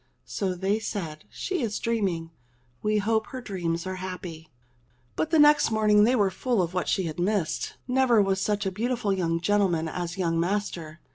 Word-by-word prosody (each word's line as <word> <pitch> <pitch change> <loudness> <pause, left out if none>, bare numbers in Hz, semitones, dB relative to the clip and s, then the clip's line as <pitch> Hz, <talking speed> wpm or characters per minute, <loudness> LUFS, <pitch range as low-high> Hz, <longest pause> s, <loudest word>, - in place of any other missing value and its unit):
So 190 -3 -2
they 195 +4 0
said, 165 -8 -5
"She 375 -5 -3
is 220 -4 -1
dreaming. 190 -8 -1 0.5
We 215 0 +1
hope 220 +1 +1
her 260 - -6
dreams 175 -7 -3
are 185 0 -4
happy." 180 -3 -7 0.7
But 315 - -1
next 300 -2 +6
morning 215 -1 +4
they 250 +3 +3
were 200 -5 +2
full 245 +3 -1
of 170 +1 -4
what 180 -1 -1
she 190 - +1
had 165 0 -4
missed. 185 -2 -1
Never 250 -3 +4
was 195 -1 +2
such 205 0 0
a 190 - 0
beautiful 225 0 -1
young 165 -3 0
gentleman 180 -3 +1
as 175 +2 -4
young 165 -3 0
master 170 -3 -2
195 Hz, 180 wpm, -26 LUFS, 175-220 Hz, 0.7 s, next